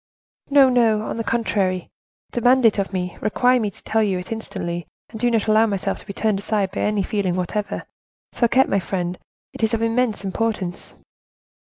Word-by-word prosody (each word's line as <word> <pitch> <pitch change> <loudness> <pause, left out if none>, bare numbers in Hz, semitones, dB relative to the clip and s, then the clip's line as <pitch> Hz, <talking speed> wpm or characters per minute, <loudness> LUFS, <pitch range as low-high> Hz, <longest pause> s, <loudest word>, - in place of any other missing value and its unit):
"No, 280 -1 +7
no, 230 -4 +3
on - - -4
the 230 - -2
contrary, 195 -6 -1 0.4
demand 245 +1 +3
it 215 -2 +4
of 195 - -1
me; 180 -2 -4
require 245 +4 +3
me 215 -3 0
to 195 - -16
tell 220 0 +1
it - - +3
to - - 0
you 180 -1 -1
instantly, 175 -7 -4 0.2
and 225 0 -8
not 230 -3 +3
to 215 - +1
allow 220 +1 +5
myself 200 -3 -2
to - - -17
be - - -4
turned 215 -1 0
aside 200 -2 -1
by 195 - -3
any 210 -1 +1
feeling 190 -3 -1
whatever. 195 +3 -2 0.5
Fouquet, 255 +2 +4
my 200 - 0
friend! 180 -1 -3 0.3
it - - -9
is 220 +1 +2
of 225 - -2
immense 230 -2 0
importance." 195 -3 -3
215 Hz, 195 wpm, -22 LUFS, 190-230 Hz, 0.5 s, No